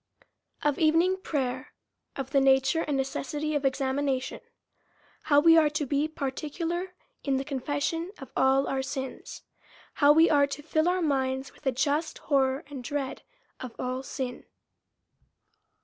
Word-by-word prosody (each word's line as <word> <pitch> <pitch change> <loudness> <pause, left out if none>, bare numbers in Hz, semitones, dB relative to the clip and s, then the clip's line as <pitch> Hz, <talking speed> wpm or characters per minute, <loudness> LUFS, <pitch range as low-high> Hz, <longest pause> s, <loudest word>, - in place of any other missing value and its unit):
Of 295 -1 +1
Evening 330 +4 +3
Prayer. 265 -7 -3 0.4
Of 270 -1 -5
the 275 - +4
nature 270 +4 +3
and 290 -3 -1
necessity 290 +3 -2
of 290 -1 0
Examination. 265 0 -1 0.9
How 290 -2 +5
we 330 +2 +7
are 305 -2 +4
to 300 0 -2
he 285 +3 0
particular 325 +5 -4 0.3
in 275 -2 +1
the 270 - -3
Confession 290 +5 -2
of 270 - -11
all 265 +1 +3
our 270 -1 -1
Sins. 265 0 -6 0.5
How 285 0 +5
we 320 +3 +6
are 285 -2 +4
to 280 +1 -7
Jill 315 +2 +1
our 365 0 0
minds 265 -2 -1
with - - -10
a - - +4
just 290 +5 0
horror 270 -1 +1
and 280 -3 -8
dread 275 0 -3 0.4
of 250 -3 -8
all 255 +1 -3
Sin. 255 -2 -5
280 Hz, 150 wpm, -28 LUFS, 265-310 Hz, 0.9 s, we